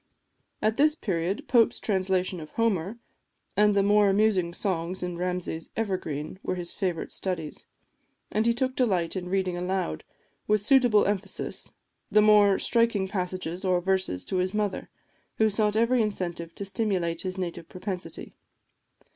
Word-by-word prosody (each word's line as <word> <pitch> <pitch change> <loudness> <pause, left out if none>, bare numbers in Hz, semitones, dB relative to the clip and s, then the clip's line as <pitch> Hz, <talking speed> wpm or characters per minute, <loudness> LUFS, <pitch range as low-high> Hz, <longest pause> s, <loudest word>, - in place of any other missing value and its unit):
At 215 +1 +2
this 300 +1 +4
period, 185 - -2
Pope's 235 -3 +4
translation 185 -2 0
of 155 -1 -10
Homer, 215 -2 0 0.6
and 210 0 +4
the 200 - +4
more 205 0 +4
amusing 195 -3 +2
songs 180 -1 -2
in 180 -1 -3
Ramsay's 180 -2 -3
"Evergreen," 185 -6 -3
were - - -2
his 175 -1 -5
favourite 180 -4 -3
studies; 170 -5 -4 0.6
and 215 +2 +1
he - - +5
took 260 +1 -1
delight 190 -10 +1
in 180 -1 -4
reading 185 -1 0
aloud, 180 - -2 0.4
with 210 -1 +2
suitable 245 -3 +5
emphasis, 200 -1 -2 0.4
the 210 - +4
more 210 -2 +6
striking 230 -5 +2
passages, 185 -1 -3
or 185 -2 +2
verses, 185 - -1
to 190 - -2
his 185 +2 0
mother, 210 -3 -2 0.5
who 220 -1 +3
sought 210 0 +1
every 235 +2 +3
incentive 175 -5 -3
to 200 - -5
stimulate 190 -5 -1
his 185 0 -4
native 170 -2 -5
propensity. 185 0 -6
190 Hz, 145 wpm, -27 LUFS, 180-210 Hz, 0.6 s, more